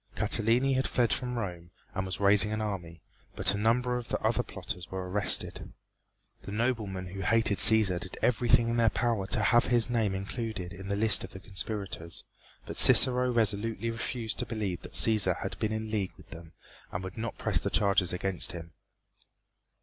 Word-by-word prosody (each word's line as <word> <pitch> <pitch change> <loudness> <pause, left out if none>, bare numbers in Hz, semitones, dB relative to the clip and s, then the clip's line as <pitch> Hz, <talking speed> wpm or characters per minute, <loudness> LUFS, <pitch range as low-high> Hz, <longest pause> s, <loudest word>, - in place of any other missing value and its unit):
Catiline 120 +5 +1
had 130 0 0
fled 120 -2 0
from 125 -1 -4
Rome 90 -6 -6 0.2
and 95 -1 -4
was 95 0 -2
raising 100 +1 +5
an 110 - -3
army, 90 -6 -6 0.3
but 95 - +2
a - - -3
number 125 +3 0
of 120 - -7
the - - -3
other - - 0
plotters 90 -1 -7
were 95 -1 -6
arrested. 100 +3 0 0.7
The - - -10
noblemen 105 -4 -2
who 95 +1 -7
hated 110 0 +1
Cæsar 105 -5 +4
did 95 - -8
everything 120 -1 +2
in 115 0 -1
their 115 -1 +3
power 115 -4 -2
to 110 0 -1
have 120 +4 +3
his 120 -1 +3
name 110 -5 0
included 100 -2 -6
in 95 +3 -10
the 100 - -2
list 110 +1 +4
of - - -10
the 95 - -9
conspirators, 95 -2 -4 0.4
but - - -8
Cicero 125 0 +7
resolutely 115 0 +1
refused 115 0 -4
to 125 - -4
believe 105 -6 -4
that - - -12
Cæsar 100 -6 +3
had 95 - -6
been 110 -1 -2
in 110 0 -4
league 100 -4 -2
with - - -19
them 80 -1 -12 0.4
and 90 - -5
would 95 0 -8
not 115 0 -6
press - - -1
the - - -3
charges 100 -4 +1
against 90 -2 0
him. 85 -2 -10
105 Hz, 190 wpm, -28 LUFS, 95-115 Hz, 0.7 s, Cicero